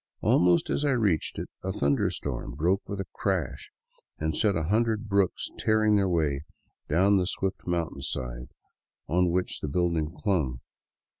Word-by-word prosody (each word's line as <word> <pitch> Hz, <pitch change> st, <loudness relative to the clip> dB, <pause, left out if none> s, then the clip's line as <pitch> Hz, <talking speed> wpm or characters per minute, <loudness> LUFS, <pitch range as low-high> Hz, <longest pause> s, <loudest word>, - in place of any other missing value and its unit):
Almost 90 Hz, 0 st, +3 dB
as -, -, 0 dB
I 145 Hz, -2 st, +3 dB
reached 100 Hz, -, +1 dB
it -, -, -4 dB
a 95 Hz, -, -2 dB
thunder 70 Hz, -7 st, +1 dB
storm -, -, -4 dB
broke 90 Hz, +6 st, +1 dB
with 100 Hz, -, -4 dB
a 95 Hz, -, -2 dB
crash, -, -, -2 dB, 0.5 s
and 80 Hz, 0 st, -1 dB
set 105 Hz, -3 st, +2 dB
a 80 Hz, -, 0 dB
hundred 110 Hz, +4 st, +1 dB
brooks 100 Hz, -2 st, +1 dB
tearing 110 Hz, -1 st, +3 dB
their 100 Hz, -2 st, +2 dB
way 75 Hz, -5 st, +1 dB, 0.5 s
down 95 Hz, +6 st, +4 dB
the 90 Hz, -1 st, +1 dB
swift 95 Hz, -1 st, -3 dB
mountainside 70 Hz, -7 st, -3 dB, 0.6 s
on 90 Hz, +4 st, +2 dB
which 90 Hz, +1 st, -1 dB
the -, -, -4 dB
building 80 Hz, 0 st, 0 dB
clung. 80 Hz, -, -1 dB
90 Hz, 155 wpm, -28 LUFS, 80-100 Hz, 0.6 s, down